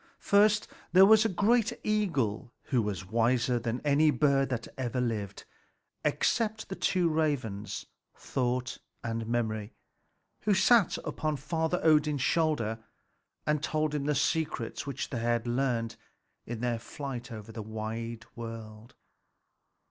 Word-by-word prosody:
First, 210 +1 +3 0.3
there 190 +1 +9
was 220 +1 +6
a - - +3
great 220 +4 +2
eagle, 140 - 0
who 125 -3 +1
was 105 -3 -3
wiser 120 +2 +2
than 120 +1 -3
any 150 +1 +4
bird 140 -2 +2
that 120 -3 -3
ever 125 -1 -2
lived 105 -5 -3 0.6
except 220 -2 0
the 190 - -4
two 180 -3 +1
ravens, 125 -11 -1 0.3
Thought 125 -1 -2 0.2
and 115 -1 -3
Memory, 110 -3 -2 0.7
who 205 -1 +2
sat 230 -3 +4
upon 155 -2 -2
Father 160 +4 -1
Odin's 150 -3 +3
shoulders 140 -11 +1 0.7
and 150 -1 +1
told 155 -1 0
him 145 -2 -1
the 150 0 +1
secrets 150 -6 -1
which 140 - -4
they 120 -1 +1
learned 120 -2 -1 0.5
in 115 -1 -5
their 120 -2 0
flight 125 -1 -6
over 110 -1 -8
the 110 - -6
wide 110 +1 -5
world. 115 -1 -8
130 Hz, 130 wpm, -30 LUFS, 115-155 Hz, 0.7 s, there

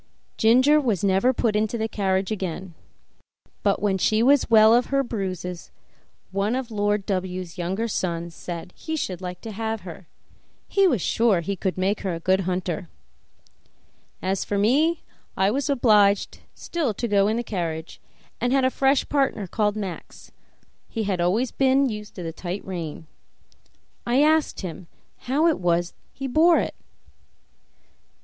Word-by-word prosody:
Ginger 260 +7 +5
was 220 - -1
never 195 +5 +3
put 230 -4 0
into 215 +2 0
the 220 0 -1
carriage 190 -2 -1
again, 185 -3 -4 0.9
but 200 0 +1
when 195 -2 +1
she 215 +4 +2
was 275 +1 +4
well 220 0 +7
of 245 +1 +3
her 275 0 +1
bruises 185 -6 -5 0.6
one 200 +4 0
of 260 -2 -3
the - - -10
Lord 205 -1 0
W 185 -1 -2
's 175 0 -13
younger 190 +6 -1
sons 170 -5 -3
said 175 +1 -7
he 315 - -5
should 185 - -3
like 180 -1 -6
to 225 - -7
have 220 +1 -3
her; 175 -1 -10 0.6
he 395 -1 +3
was 245 - +1
sure 215 -7 +2
she 200 +4 -2
would 190 -1 -1
make 195 +3 0
a 180 -4 -2
good 185 +3 +2
hunter. 180 -2 -3 1.3
As 190 +1 0
for 205 - -2
me, 295 +11 +2 0.3
I 190 +1 +3
was 280 +4 -1
obliged 210 -7 +3 0.2
still 295 -11 -2
to 235 - -2
go 200 -2 +3
in 220 +2 0
the 240 - -1
carriage, 170 -6 -4 0.4
and 245 +1 0
had 270 -1 +3
a 260 - +2
fresh 270 +1 +2
partner 270 -8 0
called 210 +3 0
Max; 195 -5 -7 0.6
he 225 - -3
had 190 -4 -1
always 210 +9 +1
been 270 0 +3
used 210 -1 -7
to 180 - -6
the 165 -1 -5
tight 180 +3 -5
rein. 165 -4 -6 1.0
I 255 +4 +4
asked 315 0 +2
him 175 -2 -7 0.4
how 290 +5 +2
it 330 -2 +3
was 175 -1 0 0.2
he 270 - -7
bore 320 +6 +4
it. - - -1
205 Hz, 165 wpm, -24 LUFS, 185-245 Hz, 1.3 s, well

